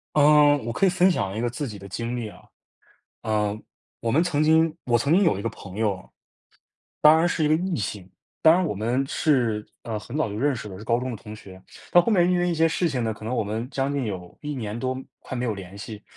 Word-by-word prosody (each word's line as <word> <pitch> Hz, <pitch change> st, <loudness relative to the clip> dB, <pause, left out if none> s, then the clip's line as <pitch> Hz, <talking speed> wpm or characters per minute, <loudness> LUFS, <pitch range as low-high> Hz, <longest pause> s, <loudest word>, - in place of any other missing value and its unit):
嗯， 145 Hz, -2 st, +5 dB
我 115 Hz, -, -2 dB
可 195 Hz, -, +1 dB
以 -, -, +5 dB
分 180 Hz, +1 st, +4 dB
享 100 Hz, -, -1 dB
一 110 Hz, -, -2 dB
个 120 Hz, -, 0 dB
自 130 Hz, +4 st, -4 dB
己 105 Hz, -3 st, -8 dB
的 100 Hz, -, -10 dB
经 115 Hz, +5 st, -3 dB
历 115 Hz, -3 st, -4 dB
啊， -, -, -15 dB, 0.8 s
呃， 105 Hz, -1 st, 0 dB, 0.4 s
我 115 Hz, -1 st, -2 dB
们 160 Hz, +5 st, +4 dB
曾 155 Hz, -4 st, +1 dB
经 160 Hz, +1 st, +4 dB
我 120 Hz, -1 st, +3 dB
曾 140 Hz, +6 st, +1 dB
经 195 Hz, +4 st, +5 dB
有 165 Hz, -, +2 dB
一 -, -, -5 dB
个 -, -, -1 dB
朋 100 Hz, 0 st, -10 dB
友。 100 Hz, -4 st, -1 dB, 1.0 s
当 155 Hz, +1 st, +8 dB
然 165 Hz, +2 st, +3 dB
是 170 Hz, -2 st, 0 dB
一 150 Hz, -, +3 dB
个 155 Hz, -, +4 dB
异 180 Hz, +1 st, -1 dB
性， 100 Hz, -3 st, -4 dB, 0.4 s
当 160 Hz, 0 st, +8 dB
然 185 Hz, -, +2 dB
我 155 Hz, -, -2 dB
们 120 Hz, +6 st, 0 dB
是， 120 Hz, -9 st, +1 dB, 0.2 s
呃， 115 Hz, -2 st, -4 dB
很 120 Hz, +5 st, -9 dB
早 155 Hz, -7 st, 0 dB
就 100 Hz, -, -5 dB
认 140 Hz, +3 st, +1 dB
识 110 Hz, -2 st, -7 dB
的， 95 Hz, -, -8 dB
是 105 Hz, -, -10 dB
高 115 Hz, +2 st, +1 dB
中 130 Hz, +1 st, -4 dB
的 -, -, -9 dB
同 105 Hz, +1 st, -10 dB
学， 95 Hz, -3 st, -13 dB, 0.3 s
到 175 Hz, -, +7 dB
后 230 Hz, -, +2 dB
面 175 Hz, -2 st, +4 dB
因 180 Hz, -, +2 dB
为 175 Hz, 0 st, +1 dB
一 175 Hz, -, +1 dB
些 165 Hz, 0 st, +3 dB
事 170 Hz, +2 st, 0 dB
情 130 Hz, -6 st, -2 dB
呢， 110 Hz, -, 0 dB
可 110 Hz, 0 st, -9 dB
能 120 Hz, +3 st, -2 dB
我 115 Hz, -, +1 dB
们 110 Hz, +4 st, -3 dB
将 135 Hz, +1 st, -1 dB
近 140 Hz, -3 st, -1 dB
有 90 Hz, -4 st, -6 dB
1 150 Hz, 0 st, -4 dB
年 110 Hz, -5 st, -4 dB
多 130 Hz, +2 st, -2 dB, 0.2 s
快 130 Hz, -, -7 dB
没 120 Hz, -, -2 dB
有 115 Hz, -4 st, -1 dB
联 95 Hz, -1 st, -10 dB
系， 105 Hz, +1 st, -8 dB
120 Hz, 280 characters per minute, -24 LUFS, 105-155 Hz, 1.0 s, 当